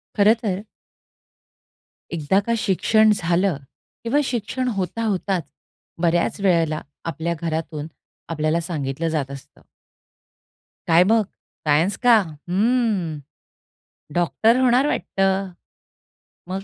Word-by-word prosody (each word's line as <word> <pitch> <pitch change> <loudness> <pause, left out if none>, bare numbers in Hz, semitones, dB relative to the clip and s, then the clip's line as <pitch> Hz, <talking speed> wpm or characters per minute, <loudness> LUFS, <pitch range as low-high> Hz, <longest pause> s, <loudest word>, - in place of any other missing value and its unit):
खरंतर 210 -2 +2 1.5
एकदा 165 +4 +2
का 235 +3 -1
शिक्षण 215 +2 +3
झालं 175 -1 +1 0.5
किंवा 235 +5 +1
शिक्षण 255 0 -2
होता 190 +5 -2
होताच 195 -4 -1 0.6
बऱ्याच 170 +2 +1
वेळेला 165 -5 +2 0.3
आपल्या 165 +1 -2
घरातून 160 -2 -3 0.4
आपल्याला 155 0 0
सांगितलं 155 -2 -3
जात 145 -4 -2
असतं. 140 -1 -12 1.3
काय 170 +1 +6
मग 220 +2 +3 0.4
सायन्स 160 +7 +3
का? 240 -2 +7 0.3
हम्म, 200 -5 +1 1.0
डॉक्टर 175 - +3
होणार 255 +2 +4
वाटतं. 195 -7 0 1.0
मग 190 +1 -3
185 Hz, 95 wpm, -22 LUFS, 165-220 Hz, 1.5 s, का